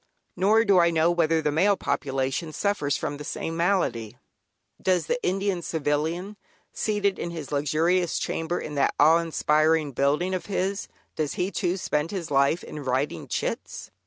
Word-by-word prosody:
Nor 215 +5 +3
do 195 -3 +5
I 170 0 +5
know 165 0 +3
whether 165 -2 +2
the 150 - +1
male 195 +6 +3
population 135 +1 -2
suffers 200 -9 0
from 145 - -4
the 150 - -7
same 165 +1 -4
malady. 165 - 0 0.6
Does 180 -4 +1
the 245 +9 -2
Indian 190 -1 0
Civilian, 160 +6 -2 0.4
seated 205 -2 0
in - - -3
his 160 -5 -7
luxurious 160 +5 +1
chamber 165 +2 -2
in 150 - -6
that 140 -1 +1
awe 160 +3 +6
inspiring 155 -2 +2
building 145 +8 +1
of 185 - -3
his, 195 0 -2 0.3
does 155 -2 -2
he 180 +2 -1
too 180 0 -1
spend 160 -4 -1
his 180 -5 -5
life 140 +5 +2
in 150 - -7
writing 130 - -1
"chits"? - - -4
165 Hz, 160 wpm, -25 LUFS, 150-185 Hz, 0.6 s, awe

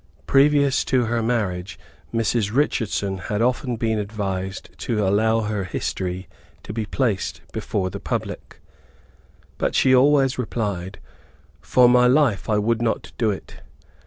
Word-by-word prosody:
Previous 140 0 +4
to 125 -2 +2
her 115 +1 0
marriage, 100 -5 -2 0.3
Mrs. 115 -2 0
Richardson 105 -7 0
had 105 +3 -3
often 125 +1 0
been 110 -2 -1
advised 100 -2 -4
to 105 -4 -1
allow 110 +3 +2
her 105 -2 -2
history 90 +1 -4 0.4
to - - -7
be 110 -1 -3
placed 115 -8 -1
before 95 -2 -2
the 100 - -6
public. - - -5 1.0
But - - 0
she 130 - +4
always 135 0 +4
replied, 100 -6 -3 0.6
"For 125 +11 +4
my 125 0 +5
life 130 -7 +2
I 105 - +3
would 115 +2 +1
not 115 -1 -1
do 115 - +2
it. 100 - -6
110 Hz, 135 wpm, -22 LUFS, 100-125 Hz, 1.0 s, my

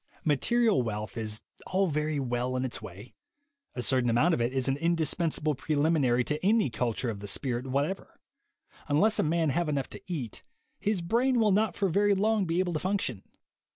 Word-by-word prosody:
Material 210 - +3
wealth 105 -3 -4
is 110 -2 -3 0.2
all 190 +1 +2
very 150 -2 -1
well 125 -1 -1
in 130 +1 -1
its 125 - -5
way; 100 +7 -10 0.6
a 125 - -2
certain 130 -2 +2
amount 145 +10 +3
of 140 - 0
it 120 +1 +1
is 130 -1 -1
an 135 - +2
indispensable 165 -1 0
prelim 150 +3 +1
inary 125 -2 +2
to 150 +2 -2
any 210 - +3
culture 120 0 -1
of 100 - -7
the 100 - -7
spirit 125 +3 -1
whatever: 140 +8 -2 0.7
un 145 +1 +3
less 220 +3 +3
a - - +4
man 160 -1 +1
have 170 +3 0
enough 140 -2 -2
to - - -8
eat, 130 -10 -4 0.4
his 205 -3 0
brain 240 +8 +2
will 215 -2 +4
not 210 -1 +2
for 200 - +1
very 200 +3 +3
long 210 +1 +2
be 165 0 -1
able 180 -1 +1
to 155 - -1
function. 185 - -2
150 Hz, 195 wpm, -29 LUFS, 125-185 Hz, 0.7 s, a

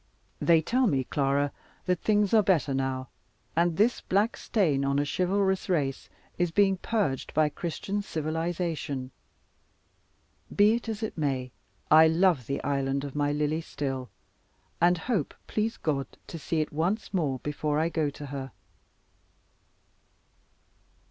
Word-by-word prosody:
They 165 -2 +4
tell 255 +7 +2
me, 135 -7 +1
Clara, 140 +1 0 0.3
that 180 -2 +1
things 210 -1 +2
are 220 - +7
better 170 -8 +2
now, 130 -1 -2 0.5
and 170 0 +2
this 225 +4 +3
black 205 +5 +1
stain 155 - +1
on 140 0 +1
a 145 - +2
chivalrous 190 +4 0
race 140 -7 -1 0.3
is 175 -1 +2
being 195 +2 +3
purged 190 - -1
by 155 0 +4
Christian 175 +6 -3
civilization. 160 -5 -3 1.4
Be 205 +2 +6
it 235 0 -3
as 220 0 -4
it 215 - -4
may, 130 -4 -1 0.4
I 160 +1 +8
love 160 - +2
the 140 0 -3
island 140 0 0
of 140 -2 -6
my 145 0 +1
Lily 150 +2 0
still; 135 -5 -4 0.7
and 175 +1 +5
hope, 185 - -2
please 220 +1 -1
God, 140 -4 -1 0.2
to 165 - -8
see 155 +2 -1
it 155 - -4
once 180 +9 -1
more, 150 -8 0
before 150 +2 -2
I 160 +2 +2
go 160 -3 0
to 145 +1 -9
her. 135 -2 -6
160 Hz, 140 wpm, -28 LUFS, 140-190 Hz, 1.4 s, I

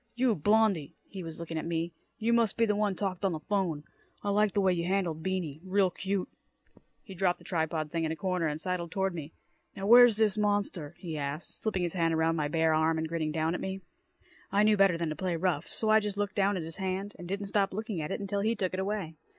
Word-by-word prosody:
"You, 245 -1 +3
Blondie," 205 -3 +2
he 195 - -7
was 165 -2 -7
looking 165 -1 -4
at - - -5
me, 170 0 -2 0.2
"you 230 +1 +1
must 230 -3 +2
be 230 - +4
the 210 -2 +1
one 205 -2 +1
talked 190 -1 -3
on 190 -3 +2
the 155 - -3
'phone. 170 -4 -1 0.4
I 205 - 0
liked 210 -1 +2
the - - +3
way 190 -1 +3
you 170 -1 -1
handled 180 -5 0
Beany. 165 -4 -3
Real 190 0 +2
cute." 195 +1 -2 0.8
He 200 - -10
dropped 185 -1 +1
the - - -18
tripod 160 -3 -1
thing 165 -1 -1
in 160 - 0
a - - -2
corner, 180 -2 -1
and 150 0 -3
sidled 180 0 -3
toward 190 +2 -1
me. 160 -2 -6 0.4
"Now 195 - -4
where's 240 0 +8
this 215 -1 +2
monster?" 205 -7 -1
he 165 -5 -5
asked, 140 +3 -5
slipping 195 -5 -1
his 175 - -1
hand 165 -3 +1
around 160 +1 +2
my 150 -2 0
bare 160 +1 +2
arm 160 +1 +2
and 160 0 -1
grinning 160 -1 -2
down 160 +1 0
at - - -3
me. 190 0 -4 0.7
I 205 +1 +4
knew 215 0 +5
better 195 -4 +4
than 165 -1 -1
to 155 - -3
play 180 +2 -1
rough, 165 -3 0
so 220 - -2
I 220 - +7
just 205 -2 -4
looked 205 0 -1
down 200 0 +2
at 170 - -3
his 165 +2 -7
hand, 190 +1 -3
and 175 - -7
didn't 200 +2 -3
stop 200 -1 +2
looking 215 -3 -3
at 150 - -4
it - - -2
until 200 0 -2
he 220 +3 +1
took 185 -4 -2
it 185 - -2
away. 190 -4 -2
185 Hz, 250 wpm, -30 LUFS, 165-205 Hz, 0.8 s, where's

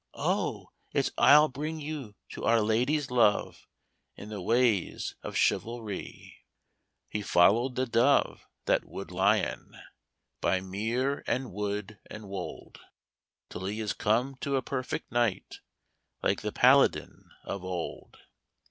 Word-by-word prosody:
'Oh, - - -2 0.2
it's - - +1
I'll 150 +2 +7
bring 155 +4 -5
you 145 -8 -6
to - - -8
Our 115 +1 +4
Lady's 125 +6 +1
love, 115 -4 +2 0.5
In 105 - -10
the 105 -3 -6
ways 115 -2 +1
of - - -7
chivalrie.' 115 -4 -2 0.7
He 105 - -4
followed 115 +7 +3
the 130 - 0
dove 120 +4 +2 0.2
that - - +2
Wood 95 -3 -8
Lyon 100 +4 0 0.6
By 95 +2 +2
mere 110 +9 -2
and 130 -4 -2
wood 105 0 -4
and 105 -1 -9
wold, 100 0 -7 0.7
Till 95 - -6
he 105 +3 -3
is 110 -1 -2
come 125 +6 0
to 140 0 -2
a 130 - 0
perfect 130 0 -4
knight, 120 -4 -1 0.6
Like - - +1
the - - -3
Paladin - - +3
of 100 -2 -5
old. 90 -2 -6
110 Hz, 130 wpm, -29 LUFS, 100-130 Hz, 0.7 s, I'll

